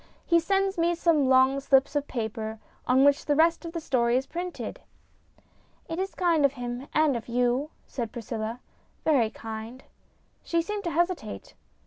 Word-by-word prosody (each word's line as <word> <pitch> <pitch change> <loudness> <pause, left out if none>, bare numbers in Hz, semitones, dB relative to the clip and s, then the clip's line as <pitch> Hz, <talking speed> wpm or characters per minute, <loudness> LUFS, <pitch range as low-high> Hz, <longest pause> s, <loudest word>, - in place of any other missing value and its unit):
He 340 -1 +4
sends 390 +2 0
me 340 +1 +2
some 320 -5 +2
long 260 +1 +5
slips 275 +1 +3
of 290 0 0
paper 220 -2 -4 0.3
on 260 +2 +5
which 285 -1 +4
the 290 - +2
rest 330 +2 +3
of 335 - -5
the 335 - -4
story 245 -5 +1
is 265 - -1
printed." 350 +3 -5 0.6
" - - -35
It 330 +1 -4
is 385 +1 -3
kind 340 -4 +2
of 280 -1 +4
him 245 +1 -5
and 305 -3 +3
of 230 - -5
you," 245 +4 +1 0.2
said 235 -5 -5
Priscilla, 230 0 -5 0.2
" - - -39
very 265 -8 +3
kind." 225 +3 -8 0.6
She 335 -1 0
seemed 415 +2 -4
to - - 0
hesitate. 345 - -2
275 Hz, 175 wpm, -27 LUFS, 245-335 Hz, 0.6 s, long